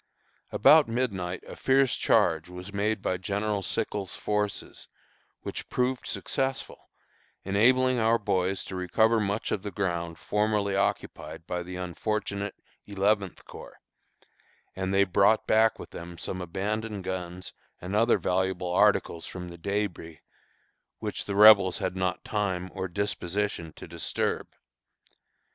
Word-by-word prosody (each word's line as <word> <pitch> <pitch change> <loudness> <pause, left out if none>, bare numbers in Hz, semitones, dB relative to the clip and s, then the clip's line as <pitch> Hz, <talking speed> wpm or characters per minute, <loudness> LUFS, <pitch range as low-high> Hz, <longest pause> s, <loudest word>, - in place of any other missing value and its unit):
About 155 -1 +6
midnight 100 -7 -2
a - - -8
fierce 135 -1 +3
charge 80 0 +2
was 90 +2 -9
made 105 0 0
by 90 - 0
General 100 +2 -1
Sickles' 100 -1 -3
forces, 105 -1 -3 0.5
which - - -6
proved 125 0 -1
successful, 135 0 -3 0.5
enabling 125 +6 +3
our 115 +1 +4
boys 95 -3 -1
to 95 - -7
recover 110 +5 +2
much 105 +1 -1
of 100 - -1
the 105 - -5
ground 85 -4 -2
formerly 105 +3 0
occupied 80 -4 -2
by 90 0 -3
the 90 +1 -7
unfortunate 100 +3 -3 0.3
Eleventh 100 -1 0
Corps, - - -11 1.0
and 95 0 -2
they 100 0 +4
brought 100 +3 +3
back 110 +1 +4
with - - -10
them 85 0 -8
some 95 +1 -4
abandoned 100 +3 -3
guns 90 0 -5 0.3
and 90 +3 -4
other 115 +3 +4
valuable 95 -1 -1
articles 85 -1 +2
from 90 -1 -7
the 85 - -10
débris, 100 -4 -3 0.8
which - - -4
the 100 - -3
Rebels 100 -4 +8
had 90 0 -2
not 95 -1 -2
time 95 -4 -2
or 95 0 -3
disposition 100 -2 -2
to - - -11
disturb. - - -2
100 Hz, 130 wpm, -28 LUFS, 90-105 Hz, 1.0 s, Rebels